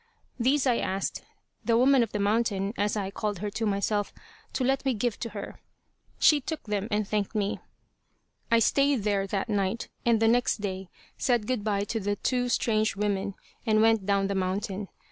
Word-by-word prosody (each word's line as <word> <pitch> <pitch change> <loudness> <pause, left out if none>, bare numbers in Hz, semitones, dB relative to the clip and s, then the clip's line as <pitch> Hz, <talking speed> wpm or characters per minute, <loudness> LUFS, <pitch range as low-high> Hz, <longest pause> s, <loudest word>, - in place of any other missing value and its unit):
These 270 +4 +2
I 245 -3 +3
asked 195 +1 -2 0.4
"the 230 -1 +3
woman 265 +1 +5
of 230 -2 0
the - - -2
mountain," 205 -1 +1
as 205 +1 0
I 195 -1 -2
called 205 0 -2
her 205 +3 -4
to 225 +2 -2
myself, 205 0 0 0.4
to 260 - -1
let 270 +2 +1
me 265 -3 +1
give 225 +1 -1
to 230 - -4
her. 205 -2 -7 0.6
She 300 -2 +5
took 315 +4 -5
them, 210 -1 -2
and 210 -2 0
thanked 210 0 -1
me. 205 -1 0 0.9
I 230 - +5
stayed 275 +1 +3
there 200 -2 +1
that 195 +3 -2
night, 205 +1 -1
and 230 -2 +3
the 225 - +3
next 240 -1 +2
day 190 -2 -4 0.3
said 240 -4 +2
good 250 -3 -1
by 200 -2 0
to 225 +2 -2
the 205 0 -1
two 245 +3 0
strange 220 -3 +1
women, 200 -1 -1 0.3
and 215 -2 +3
went 225 -3 +3
down 200 -1 +2
the 200 - -1
mountain. 195 +1 -2
210 Hz, 190 wpm, -27 LUFS, 200-235 Hz, 0.9 s, woman